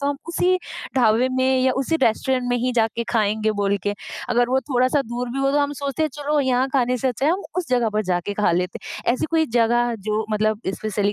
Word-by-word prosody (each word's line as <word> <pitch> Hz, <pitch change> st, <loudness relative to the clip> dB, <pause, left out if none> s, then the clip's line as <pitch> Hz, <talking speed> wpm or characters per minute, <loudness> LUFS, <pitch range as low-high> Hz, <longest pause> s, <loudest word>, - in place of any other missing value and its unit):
तो 280 Hz, -, -1 dB
हम 285 Hz, -, -1 dB
उसी 360 Hz, +2 st, +2 dB, 0.4 s
ढाबे 240 Hz, +1 st, +4 dB
में 260 Hz, 0 st, +2 dB
या 260 Hz, 0 st, +3 dB
उसी 275 Hz, +5 st, 0 dB
रेस्टोरेंट 255 Hz, +2 st, +1 dB
में 245 Hz, -, +1 dB
ही 250 Hz, +1 st, 0 dB
जा 230 Hz, -2 st, +3 dB
के 235 Hz, -, -1 dB
खाएँगे 215 Hz, -1 st, +1 dB
बोल 200 Hz, -1 st, 0 dB
के। 205 Hz, 0 st, -1 dB, 0.3 s
अगर 245 Hz, 0 st, +2 dB
वो 260 Hz, +1 st, +2 dB
थोड़ा-सा 255 Hz, +2 st, +1 dB
दूर 240 Hz, 0 st, -4 dB
भी 265 Hz, -, -4 dB
हो 275 Hz, 0 st, +2 dB
तो 290 Hz, -, +3 dB
हम 285 Hz, 0 st, +1 dB
सोचते 280 Hz, +1 st, -3 dB
हैं 310 Hz, -, +2 dB
चलो 295 Hz, +1 st, -1 dB
यहाँ 260 Hz, 0 st, +1 dB
खाने 250 Hz, -2 st, +2 dB
से 260 Hz, -, 0 dB
अच्छा 255 Hz, +3 st, -1 dB
है 315 Hz, -, +4 dB
हम 380 Hz, +3 st, -2 dB
उस 360 Hz, -6 st, -2 dB
जगह 245 Hz, -3 st, +2 dB
पर 215 Hz, 0 st, +1 dB
जाके 180 Hz, +1 st, -1 dB
खा 210 Hz, -2 st, +2 dB
लेते 180 Hz, +1 st, -1 dB
हैं। 235 Hz, -, -2 dB
ऐसी 255 Hz, -, -1 dB
कोई 320 Hz, -1 st, +2 dB
जगह 240 Hz, +1 st, +2 dB
जो 215 Hz, +1 st, 0 dB
मतलब 215 Hz, 0 st, 0 dB
स्पेशली 205 Hz, -1 st, -1 dB
245 Hz, 245 wpm, -22 LUFS, 220-270 Hz, 0.4 s, ढाबे